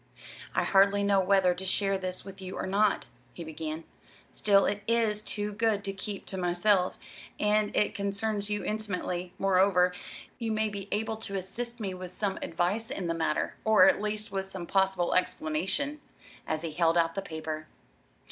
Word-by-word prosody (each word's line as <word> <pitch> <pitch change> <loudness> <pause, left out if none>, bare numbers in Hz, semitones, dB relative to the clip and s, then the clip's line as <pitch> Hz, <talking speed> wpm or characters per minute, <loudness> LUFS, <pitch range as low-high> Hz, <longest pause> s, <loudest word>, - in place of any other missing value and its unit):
"I - - +3
hardly 200 +1 +4
know 200 -1 +4
whether 190 -1 +4
to 180 +2 -7
share 195 +1 +1
this 185 -1 -3
with 195 0 -10
you 185 0 -6
or - - -2
not," 200 +2 +2 0.3
he 170 - -7
began; 160 0 -5 0.5
"still, 200 -1 +4
it 205 +1 -1
is 225 -2 +2
too 210 -1 -2
good 215 -1 +1
to 195 - -3
keep 195 +1 -5
to 190 - -5
myself, 180 +1 +2 0.4
and 210 0 +2
it 210 - +2
concerns 200 +1 -1
you 210 -1 -1
intimately; 185 -4 -2
moreover, 185 -1 +4 0.5
you 230 -2 -2
may 215 0 +1
be 200 -1 -6
able 220 +1 -1
to 200 -3 -4
assist 235 +6 -4
me 195 -4 -3
with 185 0 -7
some 195 +1 -2
advice 185 +8 -1
in 200 -9 -4
the 165 - 0
matter, 165 -1 0
or 215 -4 +6
at - - +3
least 215 0 -2
with 195 0 -3
some 185 -2 -5
possible 190 -1 +2
explanation." 185 - -1 0.5
And 155 - -1
he 165 0 -4
held 165 +1 +2
out 165 -1 +3
the 195 - -2
paper. 160 -3 -5
195 Hz, 175 wpm, -29 LUFS, 180-210 Hz, 0.5 s, or